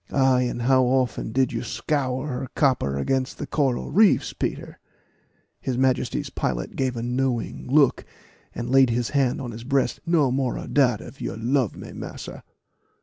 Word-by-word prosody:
"Ay, 130 -2 +3
and 120 -1 -3
how 130 +1 +4
often 125 -3 0
did 130 +1 +1
you 115 - -2
scour 130 -3 -2
her 130 -2 -4
copper 125 - +1
against 130 - -1
the - - -4
coral 135 -5 -1
reefs, 210 +1 +4
Peter?" - - -4 0.8
His 130 -2 -3
Majesty's 130 -1 0
pilot - - -3
gave 130 -2 -1
a 115 - -3
knowing 125 -1 -2
look, 140 -2 +4 0.5
and 120 +1 -4
laid 135 -1 +6
his 120 0 0
hand 135 -4 +1
on 125 -3 -5
his 115 +1 -8
breast 135 +1 0
"No 160 -6 +2
more 130 -1 0
of - - -7
dat 125 -6 +3
if 140 - -12
you - - -3
love 120 0 0
me, - - -9
massa." - - -8
130 Hz, 170 wpm, -24 LUFS, 120-135 Hz, 0.8 s, laid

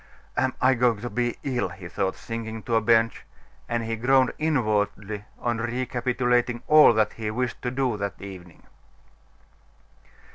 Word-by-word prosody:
"Am - - 0
I 130 +1 +4
going 120 -3 +2
to 120 - -5
be 120 -1 -1
ill?" 125 -7 -1
he 90 0 -9
thought, 95 +2 -2
sinking 115 -1 -6
on 110 - -8
to 115 - -1
a 115 - +4
bench. 115 0 +2 0.5
And 120 -1 -1
he 115 0 -2
groaned 130 +3 +3
inwardly 105 -8 0
on 120 -1 -2
recapitulating 120 0 0
all 155 -3 +8
that 110 -1 +1
he 110 -1 -4
wished 120 +2 -3
to 125 - -1
do 125 -3 -1
that 100 -1 -4
evening. 90 -4 -11
115 Hz, 155 wpm, -25 LUFS, 105-125 Hz, 0.5 s, all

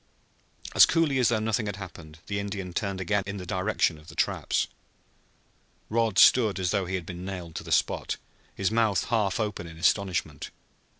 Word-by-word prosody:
As - - +8
coolly 160 -5 +2
as 125 - +4
though 120 - +2
nothing 110 0 -1
had 100 - -3
occurred 85 -4 -10
the 100 0 -2
Indian 100 -3 -5
turned 100 0 -2
again 100 +2 +1
in 100 0 -4
the 90 - -7
direction 95 -3 0
of 75 - -18
the 80 - -11
traps. - - 0 1.3
Rod 115 -3 +1
stood 110 -5 +6
as 90 -1 0
though 100 -3 0
he 95 - -2
had 90 -3 -4
been 90 +1 -7
nailed 90 -3 -6
to - - -5
the - - -9
spot, - - +1 0.4
his 95 +1 0
mouth 110 -3 +2
half 105 -4 +1
open 105 -5 -3
in 80 -1 -11
astonishment. 85 -4 0
100 Hz, 185 wpm, -27 LUFS, 90-110 Hz, 1.3 s, As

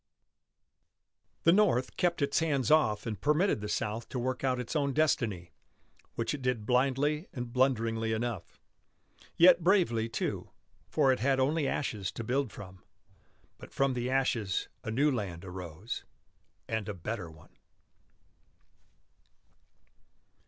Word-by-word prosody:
The 165 - +6
North 180 - +2
kept 175 -4 +1
its 140 0 +1
hands 150 -4 0
off 125 -10 +3
and 105 -4 -4
permitted 150 - +2
the 105 - -4
South 110 +2 -2
to - - -4
work 130 +2 -2
out 130 -2 +1
its 125 +5 -5
own 140 -2 +1
destiny 115 - 0 0.6
which 115 +4 -1
it 145 - -5
did 125 -4 -1
blindly 135 - +1
and 125 -6 -6
blunderingly 115 -4 +1
enough. 110 -5 -4 0.8
Yet 175 0 +7
bravely, 165 - +2
too; 115 - -3 0.4
for 140 -4 +3
it 130 - 0
had 135 +3 +2
only 145 +2 +1
ashes 105 -8 -2
to 115 - -5
build 125 +1 -1
from. 95 -2 -11 0.8
But - - -12
from 135 -1 +2
the 125 0 -2
ashes 125 -7 0
a - - -4
new 140 +7 +2
land 95 -8 -4
arose, 90 +2 -6 0.6
and 110 -1 -2
a 105 - -4
better 95 0 -5
one. 80 -1 -18
125 Hz, 135 wpm, -30 LUFS, 110-140 Hz, 0.8 s, Yet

